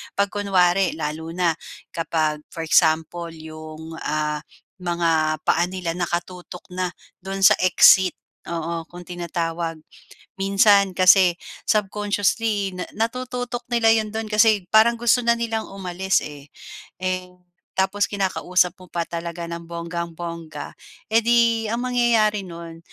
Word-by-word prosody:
'Pag 200 0 +1
kunwari, 190 -3 +2
lalo 155 +1 -4
na 175 -2 +2 0.4
kapag 155 -2 -1
for 165 - -6
example 160 +1 +2
'yong 155 0 -9
ah 150 0 -1 0.4
mga 165 -3 0
paa 175 +1 +3
nila 185 -2 -4
nakatutok 175 +1 -5
na 180 0 -1 0.3
do'n 195 +1 -4
sa - - +9
exit, 185 0 +6 0.3
oo 165 -1 -4
kung 175 0 -11
tinatawag. 170 -1 -3 0.6
Minsan 195 0 +4
kasi 185 -1 +6 0.3
subconsciously 205 -1 0
na 180 - -4 0.2
natututok 245 0 -5
nila 235 -1 +3
'yon 215 -1 -1
do'n 220 0 -3
kasi 210 -3 +3
parang 225 +2 +5
gusto 240 +1 +3
na 235 - +5
nilang 225 -1 -2
umalis 190 0 -1
eh, 145 -1 -10 0.5
eh, 185 -1 -2 0.4
tapos 200 +2 +1
kinakausap 185 -3 +1
mo 185 - -14
pa 170 - -2
talaga 170 0 -6
ng 170 0 -7
bonggang-bongga, 170 -2 -6 0.4
eh 225 - +5
'di 230 -1 +3
ang 235 +3 -2
mangyayari 235 -4 +2
no'n 170 -1 -9
180 Hz, 125 wpm, -22 LUFS, 170-205 Hz, 0.6 s, sa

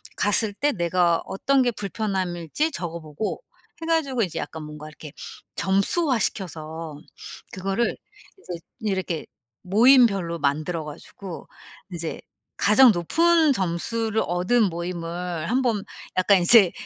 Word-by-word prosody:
갔을 205 +1 +1
때 290 +8 +1
내가 175 -3 +1
어떤 270 +7 +1
게 245 - +1
불편함일지 195 - -2
적어 170 - -5
보고 155 +7 -5 0.4
해 - - -4
가지고 290 -7 +1
이제 185 -7 -2
약간 160 - -5
뭔가 150 0 -9
이렇게 155 -1 -11 0.4
점수화 230 - +2
시켜서 160 -6 -3 0.5
그거를 195 +5 -1 0.4
이제 175 - -7 0.2
이렇게 190 -6 -2 0.4
모임별로 200 -5 +4
만들어 155 +4 -1
가지고 165 +4 -9 0.5
이제 165 -1 -5 0.4
가장 235 +4 +6
높은 320 - +3
점수를 220 +4 -1
얻은 180 +8 +2
모임을 170 -1 -4
한번 240 -5 +1 0.3
약간 185 +1 +4
이제 190 0 +7
190 Hz, 265 characters per minute, -24 LUFS, 170-230 Hz, 0.5 s, 이제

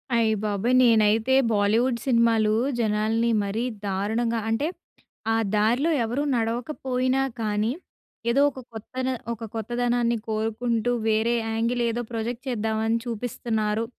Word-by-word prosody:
అయ్య 225 -1 +3
బాబోయ్! 215 +4 +1
నేనైతే 225 +1 +4 0.2
బాలీవుడ్ 225 +4 +2
సినిమాలు 230 -4 +3 0.3
జనాల్ని 220 +1 +1
మరీ 205 +4 -2 0.2
దారుణంగా 220 +4 -1
అంటే, 225 +7 0 0.7
ఆ - - +2 0.2
దారిలో 240 +10 +2
ఎవరు 245 +6 -1
నడవకపోయినా 255 +2 -1 0.2
కానీ 210 +1 0 0.6
ఏదో 260 +4 +3
ఒక 270 - -10
కొత్త 220 +2 -10
న - - 0 0.2
ఒక 230 0 -9
కొత్తదనాన్ని 240 +1 0
కోరుకుంటూ 225 +2 -1 0.2
వేరే 220 +2 +2 0.2
యాంగిల్ 230 +2 0
ఏదో 240 +1 -2
ప్రాజెక్ట్ 235 +2 -3
చేద్దామని 220 -1 0
చూపిస్తున్నారు. 225 -2 -2
230 Hz, 115 wpm, -25 LUFS, 220-240 Hz, 0.7 s, నేనైతే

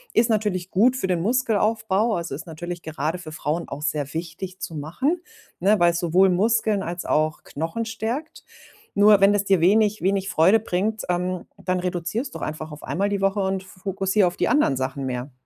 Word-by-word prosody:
ist 230 0 +4
natürlich 195 -4 -1
gut 240 +7 +4
für 255 - -2
den 180 -3 0
Muskelaufbau." 220 -1 +1
Also, 170 -4 -4
ist 150 +5 -7
natürlich 175 +2 -6
gerade 160 +2 -3
für 160 -3 -9
Frauen 160 +2 -3
auch 145 - -6
sehr 150 -2 -2
wichtig 175 +3 -5
zu 165 - -5
machen, 255 - -1 0.4
ne, 200 +2 +3
weil 175 0 +5
es 170 - -2
sowohl 180 +3 +4
Muskeln 215 +2 +2
als 175 +1 -5
auch 155 0 0
Knochen 165 +10 -4
stärkt. 225 +8 -4 0.5
Nur 205 0 +6
wenn 200 +1 +6
es 200 - +1
dir 195 -2 +3
wenig 210 +3 +3
wenig 195 +1 +1
Freude 190 +8 +4
bringt, 215 +2 -1
ähm, 180 0 -1 0.2
dann 185 0 0
reduziere 180 +6 -2
es 270 - -8
doch - - -8
einfach 155 0 -5
auf 150 - -10
einmal 200 +3 -1
die 200 -1 -1
Woche 195 +1 +1
und 190 0 -1
f 190 - -16
fokussier 195 +1 +1
auf 175 - -4
die - - +1
anderen 295 - +3
Sachen 130 +1 -3
mehr. 125 +1 -4
185 Hz, 200 wpm, -23 LUFS, 165-210 Hz, 0.5 s, Nur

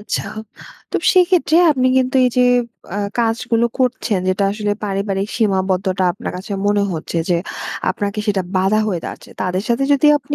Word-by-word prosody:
আচ্ছা। 205 - -3 0.7
তো - - +1 0.2
সেক্ষেত্রে 360 -3 +3
আপনি 255 -3 +1
কিন্তু 260 +1 +2
এই 250 - +3
যে, 250 - +5 0.5
আ - - -1 0.2
কাজগুলো 235 +1 +1
করছেন, 245 -5 0
যেটা 190 +2 +1
আসলে 210 -1 -1
পারিবারিক 195 0 -2
সীমাবদ্ধটা 190 -2 0
আপনার 200 - -6
কাছে 190 +2 -7
মনে 205 0 +2
হচ্ছে 165 +1 -3
যে 170 - +3 0.5
আপনাকে 205 +1 -3
সেটা 195 -3 +1
বাধা 195 +3 +2
হয়ে 180 -5 -1
দাঁড়াচ্ছে। - - -8
তাদের 185 +1 -1
সাথে 235 +3 +1
যদি 285 +2 +3
আপনি 290 - -5
205 Hz, 160 wpm, -18 LUFS, 190-250 Hz, 0.7 s, যে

